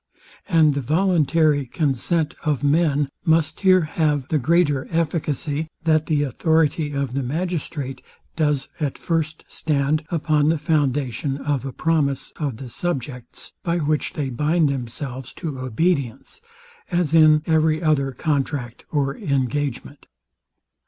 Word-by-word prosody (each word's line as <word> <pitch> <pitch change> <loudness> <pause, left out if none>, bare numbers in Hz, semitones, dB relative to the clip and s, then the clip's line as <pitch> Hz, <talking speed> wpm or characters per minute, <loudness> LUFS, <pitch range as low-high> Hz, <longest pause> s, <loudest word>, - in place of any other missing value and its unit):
And 160 -4 +5
the 140 - -2
voluntary 155 -2 +2
consent 155 +2 0
of 150 -3 0
men 145 -1 +2 0.2
must 160 -3 +2
here 185 -1 +5
have 150 -3 0
the 155 - +2
greater 145 -1 +2
efficacy, 155 -2 -1 0.2
that 155 -2 +2
the 150 -2 +2
authority 155 +2 +1
of 140 -3 -2
the 140 - -1
magistrate 145 -2 -3 0.3
does 150 -4 0
at 145 -4 -2
first 160 -2 -2
stand 150 0 0
upon 155 -3 +2
the 165 - +2
foundation 140 -3 0
of 140 -1 -2
a - - -4
promise 150 -1 0
of 140 -7 -3
the 130 - -8
subjects, 130 -7 -5
by 170 0 0
which 155 -2 0
they 140 -3 -3
bind 150 +5 +2
themselves 130 0 -5
to 150 -7 -5
obedience; 135 - -1 0.5
as 175 -4 0
in 155 -1 +6
every 160 -1 +2
other 140 -4 +2
contract 135 -3 -2
or 140 -2 0
engagement. 140 0 -2
150 Hz, 130 wpm, -22 LUFS, 135-160 Hz, 0.5 s, in